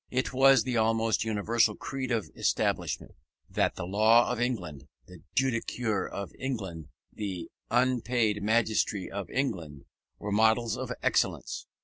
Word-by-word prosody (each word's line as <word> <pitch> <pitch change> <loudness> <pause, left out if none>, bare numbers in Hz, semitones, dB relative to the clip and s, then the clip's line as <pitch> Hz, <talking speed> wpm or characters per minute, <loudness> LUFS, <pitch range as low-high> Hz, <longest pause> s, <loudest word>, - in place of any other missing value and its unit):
It 130 +1 -1
was 135 -2 +6
the 125 0 -1
almost 115 0 +2
universal 110 0 +1
creed 130 -1 -4
of 110 - -1 0.3
Englishmen, - - -1 0.3
that - - 0
the - - -5
law 110 +5 +4
of 120 -1 -2
England, 85 - -3 0.2
the - - -14
judicature 115 -5 0
of 100 -1 -6
England, 95 - -4 0.3
the 95 -5 -5 0.2
unpaid 120 -3 +1
magistracy 110 -2 +1
of 100 -1 -5
England, 85 - -3 0.3
were 105 - -5
models 110 +2 +3
of - - -5
excellence. - - 0
110 Hz, 130 wpm, -29 LUFS, 100-120 Hz, 0.3 s, was